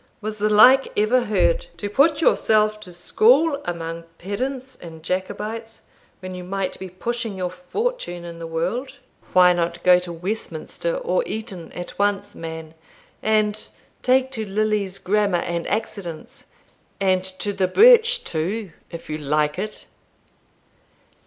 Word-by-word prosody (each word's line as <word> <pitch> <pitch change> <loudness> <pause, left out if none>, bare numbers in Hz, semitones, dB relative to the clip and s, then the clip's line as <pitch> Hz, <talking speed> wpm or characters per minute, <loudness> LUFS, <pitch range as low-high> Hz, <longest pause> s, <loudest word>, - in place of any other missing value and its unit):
was 215 0 -5
the 210 +1 +2
like 250 +6 +7
ever 240 +4 +3
heard? - - +1
to 205 - -3
put 290 +8 +3
yourself 215 -7 +3
to 185 -4 -11
school 275 - +3
among 165 -1 -4
pedants 260 +7 -4
and 160 -2 -10
Jacobites, 215 +5 -4 0.4
when 185 0 -6
you 180 0 -7
might 195 +1 -3
be 190 - -7
pushing 225 +3 -4
your 180 -1 -2
fortune 180 - -4
in 170 -1 -8
the 165 - -6
world! 180 +12 -3 0.4
Why 180 -1 +7
not 170 0 -2
go 180 -1 +7
to 180 -1 -7
Westminster 185 - -4
or - - 0
Eton 215 -6 -6
at 175 +2 -8
once, 205 0 0
man, 160 -1 -7 0.5
and 215 -1 +1 0.3
take 260 +1 +3
to 225 -4 -3
Lilly's 210 -1 0
Grammar 205 -1 +1
and 170 -1 -3
Accidence, 195 -6 -4 0.5
and 185 -2 +2
to 190 +2 -3
the 190 -2 +1
birch, 475 - +6
too, 185 +5 -3 0.2
if 170 -1 -9
you 155 - -3
like 150 +2 0
it?" 210 +2 -5
200 Hz, 140 wpm, -22 LUFS, 175-225 Hz, 0.5 s, like